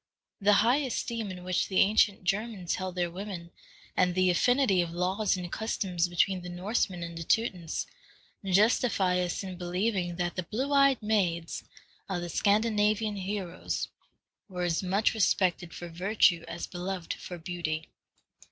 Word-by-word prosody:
The 205 +1 +5
high 245 +4 +5
esteem 235 -5 -2
in 180 -1 -7
which 180 0 0
the 190 - -2
ancient 200 -1 +3
Germans 195 -1 -1
held 185 -1 -3
their 175 -1 -1
women, 180 -2 -7 0.4
and 180 -1 +2
the 185 -1 +4
affinity 245 0 +3
of 170 - -2
laws 185 +4 0
and 180 -1 -6
customs 185 -6 -1
between 180 +2 +1
the 180 - -7
Norsemen 180 0 -1
and 170 0 -6
the 165 - -5
Teutons, 180 -5 0 0.6
justify 195 -1 +3
us 180 +2 -2
in 185 -2 -7
believing 180 0 -1
that 175 0 -2
the 185 - -1
blue 255 - -2
eyed 275 -4 +4
maids 175 -6 0 0.5
of 180 -2 -2
the 175 - -5
Scandinavian 210 +2 +2
heroes 190 -2 -3 0.6
were 180 -1 -3
as 170 -2 +1
much 195 +5 +1
respected 185 -5 +1
for 175 - -7
virtue 175 0 +2
as 170 - -5
beloved 180 -1 -4
for 180 - -8
beauty. 160 -2 -4
185 Hz, 150 wpm, -29 LUFS, 175-210 Hz, 0.6 s, The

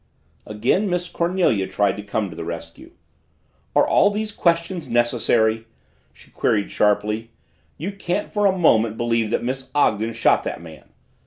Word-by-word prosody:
Again 120 - 0
Miss 180 0 -1
Cornelia 170 - 0
tried 100 -2 +1
to - - -5
come 105 -1 -3
to - - -10
the 85 - -6
rescue. 85 0 -8 0.8
"Are - - +4
all 200 - +4
these 215 +1 -3
questions 170 -1 0
necessary?" 115 -2 +1 0.4
she - - -21
queried 105 -2 0
sharply. 105 +2 0 0.5
"You 180 +7 -4
can't 200 0 -3
for 205 -1 +2
a 190 -1 +1
moment 110 -10 +3
believe 115 -2 0
that - - -1
Miss 130 +1 -4
Ogden 115 -5 +1
shot 115 - +2
that - - -4
man!" 80 -2 -13
115 Hz, 155 wpm, -22 LUFS, 105-175 Hz, 0.8 s, Are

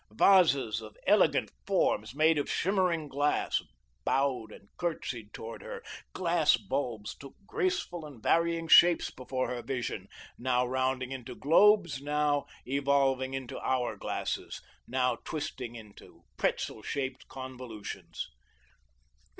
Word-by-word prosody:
Vases 135 - +4
of 110 -1 -11
elegant - - +4 0.2
forms, 110 +4 +1
made 155 +1 +4
of 145 - -2
shimmering 180 -4 +1
glass, 145 +1 +1 0.4
bowed 130 -5 0
and 100 - -14
courtesied 125 -10 -3
toward 115 +1 -8
her. - - -7 0.3
Glass - - +3
bulbs 125 -6 -3
took 140 -1 -12
graceful 370 - -1
and 140 -6 -12
varying 165 +6 +2
shapes 170 +1 +7
before 130 0 -3
her 125 -1 -3
vision, 125 -3 -4 0.3
now 125 0 +2
rounding 130 0 -1
into 125 -1 -6
globes, 175 - +4
now 145 0 +1 0.2
evolving 135 -1 +1
into 130 -2 -5
hour 130 -2 0
glasses, - - -3 0.3
now 125 -1 +1
twisting 125 -6 -5
into 105 -3 -13
pretzel 110 - -1
shaped 130 +3 -4
convolutions. 130 -5 -7
130 Hz, 120 wpm, -30 LUFS, 125-150 Hz, 0.4 s, shapes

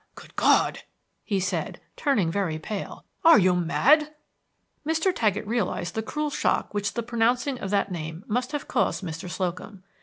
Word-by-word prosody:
"Good - - -14
God!" - - +3 0.4
he 200 -3 -1
said, 185 0 -2 0.2
turning 210 - +1
very 180 -4 -1
pale. 195 +6 -6 0.2
"Are 330 -7 +8
you 185 -3 +4
mad?" 290 - +3 0.7
Mr. 325 +4 +1
Taggett 215 -2 0
realized 210 -5 -2
the 220 - -1
cruel 300 +6 -3
shock - - 0
which 205 -1 -2
the 235 - -1
pronouncing 240 +3 0
of 195 - -4
that 200 -1 +1
name 160 +1 -5
must 245 +4 -1
have 295 -1 -4
caused - - 0
Mr. 165 0 -6
Slocum. 185 +2 -4
205 Hz, 160 wpm, -26 LUFS, 180-250 Hz, 0.7 s, Are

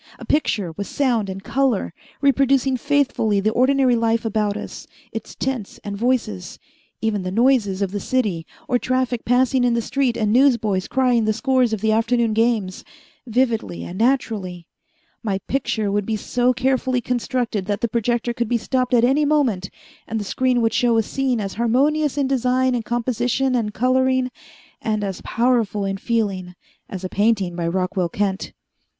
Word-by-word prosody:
A - - -10
picture 210 - 0
with 200 +5 -6
sound 240 -8 0
and 190 +1 -6
color, 245 -6 0 0.3
reproducing 275 -1 +3
faithfully 255 -6 +1
the 215 +2 +1
ordinary 260 +1 +3
life 230 0 +1
about 210 -1 0
us, - - -8 0.2
its - - -7
tints 255 -6 -4
and 200 -1 -5
voices, 225 - -1 0.4
even 220 -3 0
the 185 - -3
noises 215 -3 +2
of 190 - -2
the 205 - -3
city 200 -10 -1 0.2
or 245 - +1
traffic 255 -2 -1
passing 255 +1 +3
in 240 -1 +2
the - - +1
street 260 -3 0
and 215 -2 +1
newsboys 230 -8 +3
crying 250 -3 +2
the 215 - +2
scores 260 -1 +1
of 220 -3 -2
the 220 0 +2
afternoon 230 0 +2
games 220 -4 0 0.4
vividly 225 - 0
and 180 +3 -7
naturally. 215 -8 0 0.6
My 205 -4 -1
picture 235 -6 -1
would 205 0 -1
be 220 - 0
so 245 +4 +1
carefully 255 0 0
constructed 240 -4 -2
that 205 -1 -2
the 235 - +1
projector 235 +1 -1
could 235 -1 -2
be 240 - +2
stopped 250 +2 0
at 235 - +4
any 270 +5 +3
moment 265 -11 +1 0.4
and 225 - -2
the - - -3
screen 250 +4 +1
would 225 -1 +1
show 235 -1 +2
a 225 - +3
scene 260 +1 -1
as 195 -2 -4
harmonious 285 +5 +2
in 280 - +2
design 255 0 +1
and 240 -2 -1
composition 245 +3 0
and 225 -4 0
coloring, 255 +2 +1 0.5
and 215 -2 -1
as 195 -2 -4
powerful 230 -4 +1
in 195 0 -2
feeling, 195 -5 -2 0.3
as 190 -1 -6
a - - -1
painting 200 -3 +1
by 170 -1 -2
Rockwell 185 0 -1
Kent." 195 +1 -2
235 Hz, 170 wpm, -21 LUFS, 205-255 Hz, 0.6 s, at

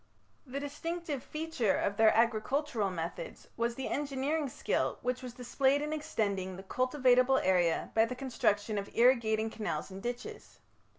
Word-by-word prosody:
The 265 +2 -4
distinctive 300 0 -4
feature 305 -9 -1
of 200 - 0
their 220 -1 +6
agricultural 230 0 +1
methods 180 - -6
was 235 0 -1
the 265 - -4
engineering 285 +1 -1
skill - - -1
which 250 +1 -1
was 250 -2 -7
displayed 265 +3 +1
in 300 +1 -2
extending 200 -10 -2
the 190 - -9
cultivatable 255 +3 +3
area 180 -3 +2
by 225 0 +5
the 250 +2 -5
construction 215 -5 0
of 200 - -6
irrigating 225 -3 +3
canals 215 -3 -4
and 190 +1 -8
ditches. 240 +3 -6
245 Hz, 145 wpm, -32 LUFS, 215-275 Hz, -, their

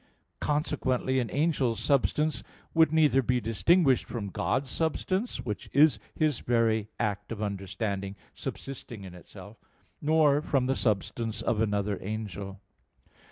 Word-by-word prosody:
Consequently 130 -3 0
an 120 -3 -1
angel's 140 -6 +1
substance 150 +2 +1 0.3
would 160 -2 +5
neither 150 -4 +4
be 125 0 +1
distinguished 130 - +3
from 105 -5 -4
God's 135 +8 0
substance, 185 - -1
which 110 -4 -5
is 150 +2 +5 0.2
His 155 -5 +1
very 110 -3 +1
act 105 0 -2
of 110 - -4
understanding 100 -1 -3 0.2
subsisting 120 -6 -7
in 95 -2 -9
itself, 100 +4 -12 0.4
nor 150 -1 +4
from 135 -4 +1
the 135 +1 +1
substance 110 +1 -1
of 110 -2 +1
another 100 -2 0
angel. 100 -1 -5
120 Hz, 125 wpm, -29 LUFS, 105-145 Hz, 0.4 s, would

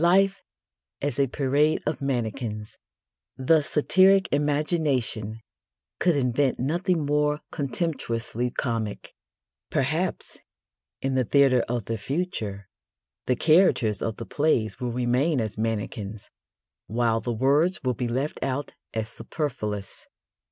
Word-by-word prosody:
Life 195 +3 +4 0.6
as 145 0 -2
a 140 - +4
parade 145 +4 +1
of 150 -3 -2
mannequins 115 -5 -3 0.6
the 150 +4 +4
satiric 190 +6 +4
imagination 145 - 0 0.6
could 175 -3 +3
invent 130 0 +1
nothing 170 +4 0
more 150 +1 +1
contemptuously 125 -5 -2
comic. 115 -4 -3 0.6
Perhaps, - - -1 0.6
in 135 0 0
the 130 -1 +2
theatre 135 0 +4
of 120 -4 -1
the 115 -1 -3
future, 105 - -3 0.6
the 125 - +3
characters 145 - +3
of 115 -2 -2
the 115 - -6
plays 125 -7 +1
will 125 -2 -2
remain 125 +5 +1
as 110 -3 -2
mannequins, 110 -1 -4 0.6
while 115 0 +1
the 120 - -2
words 140 +10 +2
will 130 -1 +1
be 120 +1 -2
left 130 +6 -2
out 135 +2 -2 0.2
as 110 -1 -1
superfluous. 110 - -4
130 Hz, 115 wpm, -26 LUFS, 115-150 Hz, 0.6 s, Life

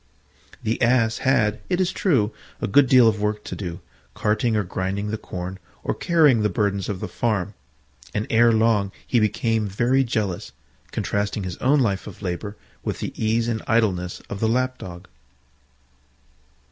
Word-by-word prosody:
The 110 +1 -1
Ass 115 -2 +3
had, 110 -5 +2
it 180 -1 +1
is 185 -1 +2
true, 125 - +1 0.3
a - - -1
good 135 +7 +5
deal 125 -3 +7
of 110 -2 +1
work 105 0 -1
to - - -6
do, 85 -4 -6 0.3
carting 110 +2 +1
or 105 - +2
grinding 95 +3 -3
the - - -1
corn, 90 +1 -6 0.2
or - - 0
carrying 150 -9 +4
the 105 - +2
burdens 100 +1 -1
of 95 -3 -3
the - - -3
farm: 105 -4 -1 0.6
and 105 - -2
ere 115 +1 +5
long 110 -3 +2
he 120 - +2
became 110 0 +1
very 120 +7 +2
jealous, 105 -5 -2 0.4
contrasting 100 0 -2
his 90 -2 -5
own 140 +2 +3
life 100 -5 0
of 105 0 -10
labour 100 +3 -4 0.3
with - - -2
the - - -4
ease 115 +1 +1
and 110 -2 -1
idleness 95 -6 +1
of 100 - -6
the 110 - +1
Lap 130 +2 0
dog. 90 0 -9
110 Hz, 170 wpm, -23 LUFS, 100-120 Hz, 0.6 s, deal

